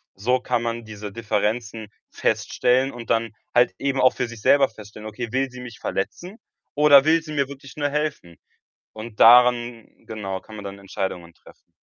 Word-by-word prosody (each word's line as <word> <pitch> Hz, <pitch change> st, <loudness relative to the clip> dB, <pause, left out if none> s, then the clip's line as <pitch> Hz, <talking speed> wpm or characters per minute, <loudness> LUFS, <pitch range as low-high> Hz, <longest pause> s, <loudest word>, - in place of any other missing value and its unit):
so 125 Hz, +6 st, +1 dB
kann 120 Hz, -, -1 dB
man 115 Hz, -1 st, -4 dB
diese 105 Hz, -1 st, -8 dB
Differenzen 110 Hz, 0 st, -2 dB, 0.2 s
feststellen 130 Hz, +2 st, 0 dB
und 120 Hz, -1 st, -10 dB
dann 115 Hz, -1 st, +1 dB, 0.2 s
halt 120 Hz, -5 st, +4 dB
eben 135 Hz, -1 st, -1 dB
auch 130 Hz, -, +5 dB
für 125 Hz, -, -2 dB
sich 115 Hz, -2 st, -10 dB
selber 140 Hz, +2 st, +4 dB
feststellen: 105 Hz, 0 st, -11 dB
„Okay, 120 Hz, 0 st, -6 dB
will 135 Hz, 0 st, 0 dB
sie 125 Hz, 0 st, -10 dB
mich 120 Hz, -3 st, -10 dB
verletzen 180 Hz, -, -4 dB, 0.4 s
oder 145 Hz, -2 st, +7 dB
will 165 Hz, +1 st, +4 dB
sie 155 Hz, -1 st, -9 dB
mir 140 Hz, -2 st, 0 dB
wirklich 135 Hz, -1 st, -12 dB
nur 145 Hz, -1 st, 0 dB
helfen?“ 145 Hz, -, -3 dB, 0.6 s
Und 110 Hz, 0 st, -10 dB
daran, 120 Hz, -1 st, +5 dB, 0.2 s
genau, 95 Hz, -4 st, -5 dB
kann 110 Hz, -, -14 dB
man 105 Hz, -, -9 dB
dann 100 Hz, 0 st, -8 dB
Entscheidungen 95 Hz, -3 st, -5 dB
treffen. -, -, -21 dB
120 Hz, 175 wpm, -23 LUFS, 105-135 Hz, 0.6 s, oder